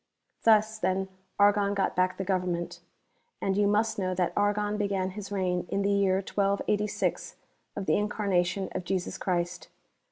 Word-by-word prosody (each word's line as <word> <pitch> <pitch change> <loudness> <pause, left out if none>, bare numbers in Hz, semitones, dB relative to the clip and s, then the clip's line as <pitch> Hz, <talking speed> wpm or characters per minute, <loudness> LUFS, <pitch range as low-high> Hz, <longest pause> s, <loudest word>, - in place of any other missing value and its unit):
Thus 220 -1 +4
then 190 -1 0 0.3
Argon 205 0 +4
got 195 -1 0
back 185 0 +1
the 195 - -2
government. 180 -2 -2 0.6
And 195 - 0
you 205 0 +3
must 215 +1 +1
know 185 -1 -1
that 180 -1 0
Argon 205 0 +1
began 200 -2 -1
his 200 0 -8
reign 180 -3 -1
in 200 - 0
the 200 - +2
year 200 -2 +3
1286 200 +1 0 0.4
of 200 - -4
the - - +3
Incarnation 195 -3 0
of - - -4
Jesus 185 0 -2
Christ. 175 -1 -2
195 Hz, 155 wpm, -28 LUFS, 185-205 Hz, 0.6 s, Thus